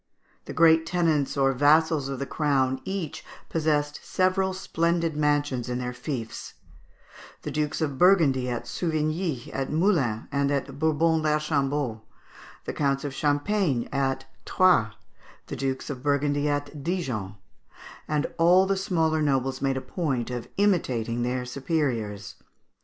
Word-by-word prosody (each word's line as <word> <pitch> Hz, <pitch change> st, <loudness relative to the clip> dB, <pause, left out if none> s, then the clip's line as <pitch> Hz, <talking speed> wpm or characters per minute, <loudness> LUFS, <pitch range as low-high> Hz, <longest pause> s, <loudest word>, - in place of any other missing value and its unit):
The -, -, -7 dB
great 160 Hz, 0 st, +5 dB
tenants 160 Hz, -6 st, +1 dB
or 135 Hz, -1 st, +3 dB
vassals 145 Hz, +1 st, +3 dB
of 135 Hz, -, -3 dB
the 140 Hz, -, -3 dB
crown 135 Hz, -3 st, 0 dB
each 190 Hz, -6 st, -4 dB, 0.3 s
possessed 150 Hz, -2 st, 0 dB
several 185 Hz, +1 st, +1 dB
splendid 170 Hz, -3 st, -1 dB
mansions 145 Hz, -4 st, 0 dB
in 125 Hz, -, -2 dB
their 125 Hz, 0 st, -3 dB
fiefs; 125 Hz, -2 st, -6 dB, 0.9 s
the -, -, -4 dB
Dukes 150 Hz, 0 st, -2 dB
of 145 Hz, -4 st, -2 dB
Burgundy, 155 Hz, -9 st, +4 dB
at 120 Hz, -1 st, -3 dB
Souvigny, 155 Hz, -4 st, -2 dB
at 135 Hz, -1 st, -2 dB
Moulins, 155 Hz, -, +1 dB
and 140 Hz, 0 st, +1 dB
at 140 Hz, -1 st, -2 dB
Bourbon 160 Hz, +1 st, +2 dB
l'Archambault; 145 Hz, -6 st, 0 dB, 0.6 s
the -, -, -4 dB
Counts 140 Hz, -2 st, 0 dB
of 145 Hz, -2 st, -4 dB
Champagne, 145 Hz, -, 0 dB
at 135 Hz, -1 st, -1 dB, 0.2 s
Troyes; 175 Hz, -13 st, +3 dB, 0.5 s
the -, -, -6 dB
Dukes 135 Hz, +1 st, -3 dB
of 130 Hz, -3 st, -7 dB
Burgundy, 145 Hz, +1 st, +1 dB
at 145 Hz, 0 st, -3 dB
Dijon; 130 Hz, -, -3 dB, 0.7 s
and 150 Hz, -1 st, 0 dB
all 180 Hz, +3 st, +6 dB
the 195 Hz, 0 st, 0 dB
smaller 160 Hz, -5 st, +1 dB
nobles 135 Hz, -3 st, 0 dB
made 135 Hz, -1 st, 0 dB
a -, -, -3 dB
point 130 Hz, -10 st, -2 dB
of 120 Hz, -2 st, -5 dB
imitating 125 Hz, -, +1 dB
their 125 Hz, +1 st, -1 dB
superiors. 125 Hz, -, -2 dB
145 Hz, 135 wpm, -26 LUFS, 130-160 Hz, 0.9 s, all